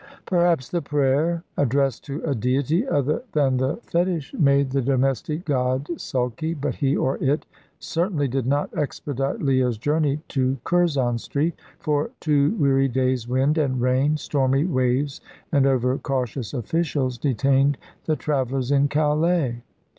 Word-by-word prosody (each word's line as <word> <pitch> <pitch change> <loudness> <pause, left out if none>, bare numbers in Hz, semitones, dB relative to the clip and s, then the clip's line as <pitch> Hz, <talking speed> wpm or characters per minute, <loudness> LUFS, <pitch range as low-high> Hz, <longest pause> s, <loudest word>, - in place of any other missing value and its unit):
Perhaps 170 -7 +2
the 175 - -1
prayer 145 +4 +1
addressed 135 -2 +1
to 145 +2 -5
a 145 - 0
Deity 135 - 0
other 145 - +1
than 135 -4 +2
the 130 +3 0
fetish 170 -4 -1
made 140 -2 +3
the 135 0 +1
domestic 135 +5 0
god 130 -1 0
sulky, 130 +4 -2
but 145 -2 -2
he, 140 -1 0
or 135 - -1
it, 145 +3 +1 0.3
certainly 165 -4 -1
did 130 -1 -2
not 145 +2 0
expedite 140 -2 -3
Leah's 130 -4 +2
journey 145 +3 0
to 130 0 0
Curzon 140 -9 +1
Street. 150 +8 -1 0.2
For 150 -1 -1
two 150 +4 +2
weary 135 -5 +3
days 130 -2 0
wind 135 +5 +2
and 130 -4 0
rain, 130 +5 +2
stormy 135 0 +1
waves 130 -2 0 0.3
and 140 -3 +3
over 130 -1 +2
cautious 130 -3 -3
officials, 130 -1 -1
detained 135 +1 +2 0.3
the 155 - +1
travellers 135 -3 -1
in 140 0 +4
Calais. 150 -3 +1
140 Hz, 140 wpm, -23 LUFS, 130-150 Hz, 0.3 s, in